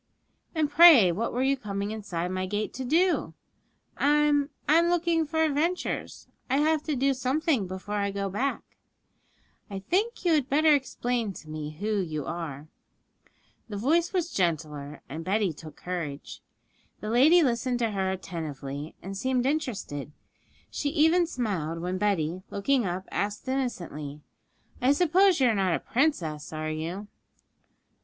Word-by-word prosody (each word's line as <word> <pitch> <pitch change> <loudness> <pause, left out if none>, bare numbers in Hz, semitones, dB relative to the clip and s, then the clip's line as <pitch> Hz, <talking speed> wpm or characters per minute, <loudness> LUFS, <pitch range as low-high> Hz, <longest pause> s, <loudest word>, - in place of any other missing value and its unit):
'And 310 -2 +2
pray 290 - +8
what 220 +7 -2
were 250 +2 0
you 275 +1 +3
coming 200 -4 -4
inside 185 -5 -4
my 185 0 -2
gate 205 +2 -2
to 265 - -5
do?' 340 +8 +1 0.6
'I'm 295 0 +3 0.2
I'm 330 +3 +5
looking 340 -2 +1
for 320 +1 +1
adventures; 320 +4 -1 0.2
I 265 - +2
have 310 +1 +2
to 305 - -1
do 270 +2 +2
something 265 - 0
before 190 +3 -5
I 200 0 0
go 200 0 -2
back.' 245 +9 -3 0.9
'I 200 - -5
think 415 +3 0
you 340 - +4
had 285 -4 +1
better 305 +2 +5
explain 245 -5 -1
to 155 - -12
me 155 -1 -5
who 210 0 0
you 155 -6 -3
are.' 155 -3 -5 1.0
The 205 - -4
voice 325 +10 +2
was 355 -3 -1
gentler, 150 -5 -2
and 160 +4 -6
Betty 195 0 +1
took 155 0 -11
courage. 165 -6 -6 0.6
The 215 - -4
lady 310 +9 +6
listened 245 -1 0
to 230 -2 0
her 190 -2 -1
attentively, 155 -6 -5
and 195 +2 -6
seemed 255 +4 0
interested; 225 - -2 0.6
she 290 - -1
even 325 +3 +3
smiled 190 - -2
when 180 +2 -3
Betty, 185 -4 0
looking 240 +2 +1
up, 180 +2 -4
asked 205 +4 -3
innocently, 170 - -3 0.6
'I 260 +3 +5
suppose 360 +3 +4
you 255 -2 +4
are - - +2
not 190 -4 +1
a - - -2
princess, 185 - -1
are 155 0 -3
you?' 170 +6 -4
215 Hz, 150 wpm, -27 LUFS, 175-290 Hz, 1.0 s, pray